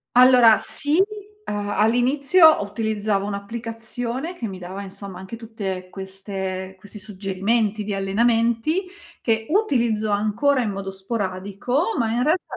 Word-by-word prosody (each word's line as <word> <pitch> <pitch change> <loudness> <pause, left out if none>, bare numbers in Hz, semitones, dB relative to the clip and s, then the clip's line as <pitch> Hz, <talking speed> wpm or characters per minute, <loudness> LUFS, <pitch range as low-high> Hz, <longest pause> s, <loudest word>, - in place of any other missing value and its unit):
Allora, 250 -3 +7
sì, 300 +6 +3 0.5
uhm, 205 0 -3
all'inizio 265 - +4
ho 310 -10 +4
utilizzavo 205 -1 -1
un'applicazione 230 - -5
che 230 - -4
mi 190 -2 -7
dava, 190 +3 -7
insomma, 195 -1 -8
anche 190 +5 -8
tutte 195 -5 -5
queste 190 -1 -6
questi 205 +2 -11
suggerimenti 205 +2 -1
di 200 -1 -3
allenamenti, 230 - +1 0.4
che 225 -1 0
utilizzo 235 - +1
ancora 225 +7 +1
in 220 - -1
modo 195 -1 -5
sporadico, 200 - -2
ma 225 -3 0
in 240 +2 0
realtà 315 +7 +2
215 Hz, 130 wpm, -22 LUFS, 195-240 Hz, 0.5 s, Allora